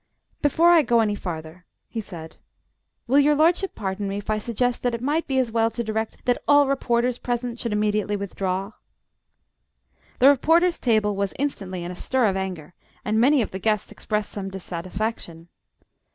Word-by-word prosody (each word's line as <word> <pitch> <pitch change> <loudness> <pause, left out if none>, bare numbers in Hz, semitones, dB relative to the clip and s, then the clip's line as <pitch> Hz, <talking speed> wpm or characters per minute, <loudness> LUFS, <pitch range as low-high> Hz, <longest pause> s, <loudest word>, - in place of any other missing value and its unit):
"Before 325 +4 +4
I 340 -2 +7
go 240 -5 +2
any 210 -2 +1
farther," 170 -2 -7 0.2
he 225 - -4
said, 165 -6 -10 0.7
"will 270 +4 +4
your 295 +1 +4
lordship 345 +5 +2
pardon 200 0 -3
me 195 +1 -3
if 205 +1 -4
I 215 - 0
suggest 240 +2 -1
that 245 -1 0
it - - -5
might 300 +6 0
be 265 - -1
as 255 -3 +1
well 225 0 +2
to 235 +1 -3
direct 220 0 -4
that 245 -1 +1
all 290 0 +6
reporters 250 -2 0
present 240 -1 -3
should 235 - -3
immediately 210 0 0
withdraw?" 195 0 -3 1.5
The 265 - +7
reporters' 330 +6 +3
table 215 -4 +2
was 200 0 -2
instantly 195 -10 -3
in 175 - -5
a - - -7
stir 255 +6 0
of 195 -3 +1
anger, 180 -5 -5 0.3
and 215 -1 +1
many 270 0 +4
of - - -6
the 190 - -5
guests 215 +1 0
expressed 210 -1 -3
some 195 -2 -5
dissatisfaction. 180 -1 -5
220 Hz, 180 wpm, -24 LUFS, 195-255 Hz, 1.5 s, I